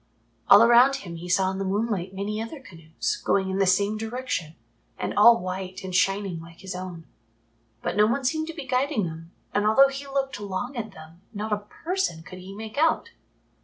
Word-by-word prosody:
All - - +9
around 240 +3 +6
him 175 -11 -7
he 175 +2 -8
saw 190 0 +2
in 190 - -5
the - - -1
moonlight 195 -1 -1
many 205 +3 -3
other 230 +7 -6
canoes 165 -10 -5
going 190 -1 +1
in 190 - -1
the 195 - +3
same 200 +3 +2
direction 225 -8 -4 0.4
and - - -3
all 235 0 +7
white 185 +1 -5
and 185 -1 -6
shining 195 -2 +1
like 165 0 -14
his 190 -1 -6
own. 180 -3 -7 0.8
But - - -2
no 210 0 +6
one 260 +4 -1
seemed 315 +4 0
to 330 - -5
be 300 - -6
guiding 250 -5 0
them, 165 0 -8 0.2
and 205 - +2
although 270 +6 +6
he 275 +1 -7
looked 270 -4 -2
long 205 +7 -4
at 220 -4 -5
them 160 +1 -14
not 210 +1 -2
a - - +2 0.3
person 360 - -1
could 185 +4 -10
he 190 +2 -10
make 220 +5 -6
out. 320 +1 +2
200 Hz, 200 wpm, -25 LUFS, 185-245 Hz, 0.8 s, All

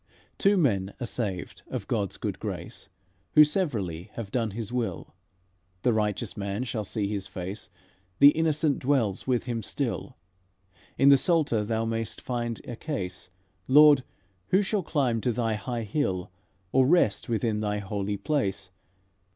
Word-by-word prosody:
"Two 200 +1 +4
men 100 - +1
are 125 - -3
saved 100 -7 -4
of - - -5
God's 100 -3 -1
good - - -4
grace, - - -6 0.4
Who 155 - +9
severally 110 - -1
have 110 -4 -6
done 115 -3 0
His 110 +2 -6
will: 120 -2 -3 0.7
The 120 - +3
righteous 105 0 -1
man 100 +3 -3
shall 110 -3 -3
see 100 +1 -2
His 100 -2 -3
face, 95 +4 -6 0.5
The 140 +4 +9
innocent 155 -2 +1
dwells 125 -8 0
with 125 -2 +1
Him 120 -2 -3
still. - - -3 0.8
In 140 - +6
the 140 - +8
Psalter 155 - +2
thou 110 +1 -1
may'st 115 -1 -2
find 120 -2 -3
a 120 - -6
case: 95 - -5 0.4
'Lord, 145 0 +7 0.4
who 190 +3 +3
shall 200 +1 0
climb 135 -9 0
to 125 - +1
Thy 115 -1 0
high 115 +3 -3
hill, 95 -6 -2 0.4
Or 130 -1 +4
rest 155 - +3
within 110 -2 0
Thy 105 -1 -1
Holy 100 0 -3
Place?' 100 -6 -1
115 Hz, 150 wpm, -27 LUFS, 100-140 Hz, 0.8 s, Who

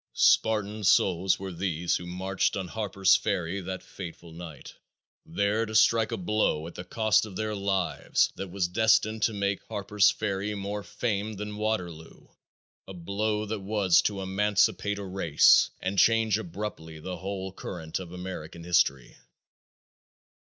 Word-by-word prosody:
Spartan 105 -1 +2
souls 95 0 +3
were 95 0 -6
these 85 -1 -1
who 90 - -8
marched 95 +3 -1
on 95 -2 -4
Harper's 100 -3 +2
Ferry 95 -2 -1
that 95 +1 -6
fateful 85 -2 -9
night, 80 -3 -10 0.5
there 105 +2 0
to 110 -1 -5
strike 110 0 +4
a - - -2
blow 95 -5 0
at 85 - -8
the 90 - -7
cost 110 +1 +2
of 100 - -11
their 110 +1 -2
lives 100 -1 0
that 95 0 -6
was 90 -1 -1
destined 110 +2 +2
to 110 - +3
make 100 -1 -1
Harper's 105 -1 +2
Ferry 105 0 -2
more 100 +1 -4
famed 105 -1 -3
than 105 +1 -5
Waterloo 90 -7 -4 0.6
a 95 - -9
blow 105 +4 -2
that 110 0 -3
was 95 -3 +3
to 100 -2 -2
emancipate 105 +1 +1
a 100 - -5
race 90 -5 +4
and 95 +1 0
change 110 -2 +4
abruptly 85 -5 -6
the 90 +3 -6
whole 95 +1 -5
current 80 -4 -5
of 90 -2 -8
American 90 -3 -7
history. 75 -8 +1
95 Hz, 150 wpm, -27 LUFS, 90-105 Hz, 0.6 s, strike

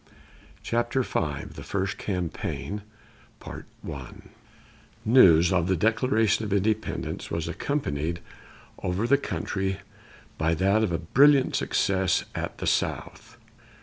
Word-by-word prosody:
CHAPTER 120 +3 0
V 75 -10 -2
THE - - -9
FIRST 100 0 -2
CAMPAIGN 95 +2 -3 2.2
News 90 -8 +6
of 85 -2 +2
the 95 - +2
Declaration 110 +1 +2
of 105 - -4
Independence 100 +2 -1
was 85 0 -2
accompanied 85 - -2 0.6
over 90 +5 -1
the 140 +3 +4
country 95 -7 -2 0.6
by 80 +1 +2
that 100 +6 +2
of 105 - 0
a 85 - +1
brilliant 135 - +4
success 95 -1 +1
at - - -4
the - - -5
South. - - -2
95 Hz, 110 wpm, -26 LUFS, 85-115 Hz, 2.2 s, News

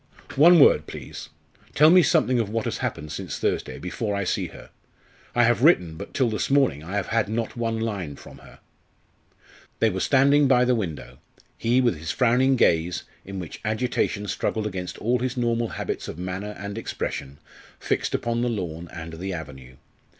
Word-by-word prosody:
"One 170 +5 +7
word, 75 - +5
please. 70 - -8 0.5
Tell 155 +2 +7
me 180 0 +8
something 145 -8 +2
of 110 -3 -1
what 115 +1 -2
has - - -3
happened 75 +1 -4
since - - -5
Thursday, - - -2
before 100 +4 -3
I 100 - -1
see 90 - -1
her. - - -13 0.6
I 120 - +5
have 120 0 +3
written 90 - +4
but - - -8
till 130 - +1
this 110 -2 -2
morning 135 - +2
I 90 +5 -6
have 100 -2 -2
had 115 -2 +1
not 115 +1 -3
one 115 -1 -2
line 100 -10 -3
from - - -13
her." - - -16 1.2
They 115 - +2
were 95 - -3
standing 140 +4 +4
by 125 -1 +4
the 125 - +3
window, 95 -10 -4 0.4
he 120 +3 +2
with 120 -11 +1
his 80 +2 -6
frowning 130 +2 +3
gaze, 85 -6 +2 0.2
in 95 0 -7
which 90 -3 -7
agitation 110 -2 -1
struggled 110 +2 -2
against 95 -3 -5
all 120 +3 0
his 125 +1 -3
normal 120 -1 0
habits - - -4
of - - -7
manner 95 +4 -5
and 100 +2 -5
expression, 70 -10 -5 0.4
fixed - - -1
upon 120 0 -1
the 120 - +1
lawn 85 -6 -4
and 80 0 -8
the 95 +4 -5
avenue. 65 -6 -9
110 Hz, 185 wpm, -24 LUFS, 90-125 Hz, 1.2 s, me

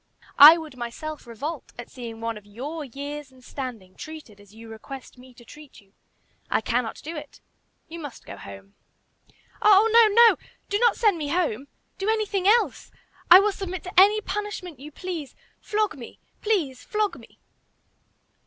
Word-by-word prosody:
I 305 +4 +11
would 315 -5 -9
myself 250 +5 -7
revolt 285 +7 -6
at 240 - -9
seeing 230 -3 -8
one 230 0 -3
of 210 -1 -13
your 285 +10 -6
years 285 +2 -7
and 260 -1 -20
standing 240 -9 -7
treated 300 -4 -11
as 205 -1 -19
you 225 +2 -13
request 250 +4 -10
me 255 +1 -15
to 240 -1 -17
treat 300 +3 -14
you. 195 -2 -25 0.6
I - - +2
cannot 230 +1 -2
do 325 +3 -6
it. 300 - -10 0.5
You 335 +1 -9
must 290 -5 -9
go - - -9
home." 100 0 -12 0.9
"Oh, 420 +1 +6
no! 465 -1 +8 0.2
no! 455 - +5 0.3
Do 405 - 0
not 475 0 +4
send 415 -7 +2
me 295 - -3
home! 285 -6 -1 0.3
Do 390 +2 -1
anything 410 -4 0
else. 460 +3 +2 0.4
I 360 - +11
will 415 +1 +2
submit 375 -2 -6
to 365 - -8
any 415 +3 +5
punishment 415 - -5
you 295 +3 -10
please. 335 -4 -6 0.2
Flog 425 0 -1
me; 245 -4 -11 0.2
please, 330 - -1
flog 425 -2 -2
me!" - - -18
295 Hz, 170 wpm, -24 LUFS, 240-380 Hz, 0.9 s, I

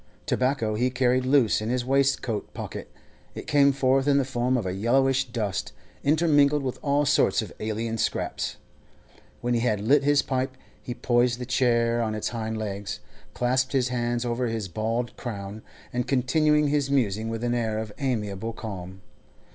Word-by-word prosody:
Tobacco 125 -4 0
he 120 +4 +1
carried 130 0 +1
loose 130 -6 +3
in 110 - -3
his 125 0 0
waistcoat 135 -5 0
pocket; - - -7 0.4
it - - -7
came 140 -1 +4
forth 135 0 +2
in 140 -1 +4
the 140 - +2
form 125 0 0
of 115 - -2
yellowish 130 +8 +2
dust, 115 -6 -3 0.3
intermingled 145 -2 +3
with 130 -2 -3
all 145 0 +2
sorts - - +3
of - - -9
alien 110 +1 -3
scraps. - - -2 0.9
When 120 0 0
he 120 - +2
had 115 -3 +1
lit 135 +7 +3
his 145 0 +3
pipe, 130 0 -2 0.2
he 120 - -6
poised 120 -1 +2
the 125 - -5
chair 120 -2 +2
on 110 -2 -1
its 110 - -2
hind 110 -1 -3
legs, 100 -2 -4 0.4
clasped 130 +2 +1
his 130 -2 +2
hands 120 -1 -1
over 120 +1 -1
his 115 -3 -3
bald 115 +6 -2
crown, 105 -3 -6 0.3
and 125 0 -1
continued 150 +4 +2
his 145 -1 +1
musing 110 -5 +1
with 115 0 -4
an 120 0 0
air 110 -3 -1
of 110 -1 -5
amiable 115 -5 -2
calm. 95 -4 -7
120 Hz, 170 wpm, -26 LUFS, 110-135 Hz, 0.9 s, came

